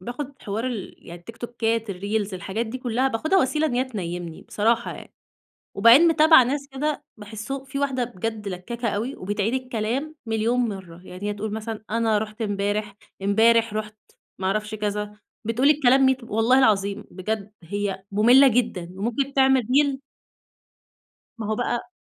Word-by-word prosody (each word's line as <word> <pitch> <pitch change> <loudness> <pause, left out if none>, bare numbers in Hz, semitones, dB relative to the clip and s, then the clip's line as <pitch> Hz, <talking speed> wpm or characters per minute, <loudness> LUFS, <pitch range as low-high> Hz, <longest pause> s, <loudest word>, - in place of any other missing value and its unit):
باخُد 260 +6 -7
حوار 215 +5 -3
ال 230 -7 -5
يعني 170 0 -9
التيكتوكات 230 +1 -3
الreels 200 +2 -2
الحاجات 205 +5 -3
دي 255 +4 -5
كلها 250 +1 0
باخُدها 315 +11 +1
وسيلة 305 +2 +1
إن 245 - -2
هي 255 +1 +2
تنيمني 175 -8 -6
بصراحة 230 +3 0
يعني، - - -12 0.6
وبعدين 230 +11 +7
متابعة 315 -3 +7
ناس 275 +3 -2
كده 295 +2 -2
باحسه 220 +6 -6
في 275 +1 -5
واحدة 270 -3 0
بجد 220 -2 -5
لكاكة 230 +6 -4
أوي 220 +6 -2
وبتعيد 205 +4 -2
الكلام 255 +4 -2
مليون 225 +2 0
مرة، 190 -7 -4
يعني 185 +3 -6
هي 205 - -1
تقول 210 +1 -5
مثلًا 220 0 -5
أنا 225 -1 +2
رُحت 215 +2 -5
امبارح، 205 0 -1 0.3
امبارح 225 +3 +3
رُحت 215 0 -4 0.4
ما 190 - -1
اعرفش 215 +2 -1
كذا، 210 0 -3 0.3
بتقول 245 +6 +2
الكلام 270 -2 +5
ميت 260 -1 +2
والله 230 +3 +3
العظيم 205 -4 +2
بجد 205 +2 -4
هي 195 +1 -3
مُملّة 245 +7 +6
جدًا، 220 -8 0
وممكن 245 +6 -2
تعمل 265 -1 +4
reel 270 +4 +2 1.4
ما 220 - -4
هو 215 - 0
بقى 240 +4 -2
225 Hz, 155 wpm, -24 LUFS, 205-255 Hz, 1.4 s, وبعدين